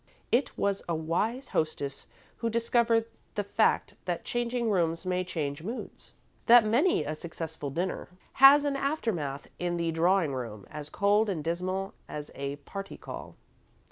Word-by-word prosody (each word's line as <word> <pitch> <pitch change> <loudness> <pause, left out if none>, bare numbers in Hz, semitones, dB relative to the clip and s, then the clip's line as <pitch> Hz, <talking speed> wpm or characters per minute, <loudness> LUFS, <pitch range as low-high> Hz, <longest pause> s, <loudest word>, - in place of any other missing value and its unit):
It 250 +4 +1
was 200 -1 +1
a 170 - +1
wise 205 +12 -1
hostess 145 -3 -2 0.3
who 230 - -1
discovered 230 0 +2 0.3
the 205 - 0
fact 210 +2 +2
that 175 -2 -2
changing 240 -1 0
rooms 165 -2 +1
may 185 0 0
change 150 -5 -3
moods; 225 +9 -7 0.3
that 235 -1 +8
many 235 - +3
a 150 +1 -3
successful 160 -2 -5
dinner 175 +6 -3 0.3
has 285 +2 +9
an 285 -1 +1
aftermath 220 - -2
in 175 -1 -1
the 170 -1 0
drawing 165 -1 +2
room 115 -6 -5
as 150 -1 -6
cold 205 +2 +3
and 165 -6 -2
dismal 185 +4 -2 0.2
as 150 0 -6
a 140 0 -4
party 195 +7 -8
call. - - -8
185 Hz, 150 wpm, -29 LUFS, 155-225 Hz, 0.3 s, has